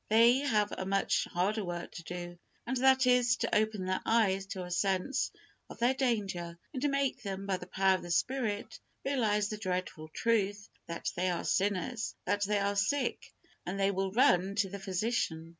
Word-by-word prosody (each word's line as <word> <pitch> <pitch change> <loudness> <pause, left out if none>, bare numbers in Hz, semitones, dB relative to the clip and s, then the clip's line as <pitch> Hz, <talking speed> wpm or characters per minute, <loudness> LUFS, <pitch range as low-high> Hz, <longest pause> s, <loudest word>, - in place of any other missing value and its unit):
They 230 +4 +6
have 215 -8 +1
a - - -4
much 195 +1 +1
harder 200 +5 0
work 175 -1 -5
to 170 - -9
do, 175 0 -7 0.3
and 260 - -2
that 265 +1 +5
is, 250 0 +4
"to 230 - -1
open 215 -3 +1
their 185 0 -1
eyes" 195 -4 +2
to 190 -2 -5
a 180 - -8
sense 190 +7 0 0.4
of - - -10
their 240 +3 +3
danger, 200 -10 -1 0.2
and 285 +1 0
make 275 -1 0
them, 195 -1 -5
by 195 -2 0
the 180 - -10
power 190 0 +3
of - - -11
the 175 - -8
Spirit, 215 +3 -1 0.3
realize 215 -7 +1
the 215 - -5
dreadful 180 -5 -3
truth 205 +2 0 0.2
that 170 - -3
they 185 +1 +1
are 175 - -1
sinners, 205 +4 0
that 205 +2 0
they 210 +1 +1
are 200 0 0
sick, 255 +8 0 0.3
and 190 +3 -4
then 195 - +3
they - - +2
will 190 0 -1
run 195 -4 +3
to 200 -2 +1
the 200 +1 -6
Physician. 185 -4 -1
200 Hz, 190 wpm, -31 LUFS, 185-230 Hz, 0.4 s, They